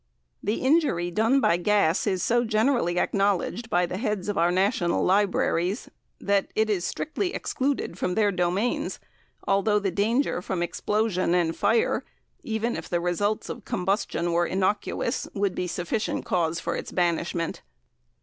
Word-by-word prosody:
The 210 +3 -1
injury 260 - +2
done 225 +8 +3
by 170 - +3
gas 195 -1 +2
is 185 -3 0
so 240 +1 +2
generally 220 -5 +1
acknowledged 200 +5 0
by 175 -2 +2
the 185 +2 -5
heads 210 -4 -2
of 205 - -1
our 170 +1 +3
national 190 0 +1
libraries, 190 0 +1 0.3
that 200 -1 +1
it 220 0 +2
is 185 -4 0
strictly 360 - -2
excluded 265 -9 -2
from 180 - -1
their 210 -2 +3
domains, 185 +5 -1 0.5
although 200 +2 +3
the 200 -2 0
danger 220 +3 +1
from 180 -1 -2
explosion 185 -1 0
and 165 -2 +1
fire, 225 +3 +2 0.4
even 225 +1 -2
if - - -6
the 175 - +1
results 190 +5 -1
of 235 - -7
combustion 180 -3 -1
were 170 +1 +2
innocuous, 195 - -1
would 200 -2 0
be 180 - -2
sufficient 180 +5 -2
cause 170 -2 0
for - - -2
its - - -5
banishment. 170 -1 -1
195 Hz, 150 wpm, -26 LUFS, 175-220 Hz, 0.5 s, done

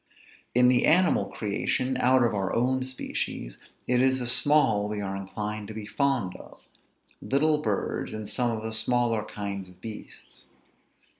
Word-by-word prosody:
In 125 0 +6
the 125 -1 +4
animal 180 +3 +4
creation, 120 +5 -1
out 130 0 +4
of 120 - +1
our 95 -2 -1
own 130 +2 +1
species, 125 - -4 0.3
it 125 0 +2
is 130 0 +3
the 125 - -4
small 125 -5 +3
we 105 -1 -3
are 95 -1 -3
inclined 105 +2 -5
to 110 - -8
be 110 -1 -6
fond 125 -6 0
of; - - -14 0.6
little 150 +3 +2
birds, 105 -9 -2
and 110 -1 -6
some 120 +3 0
of 110 -1 -3
the 110 0 -4
smaller 115 -1 +1
kinds 100 -3 -5
of 90 0 -18
beasts. 110 +2 -10
115 Hz, 160 wpm, -27 LUFS, 105-130 Hz, 0.6 s, In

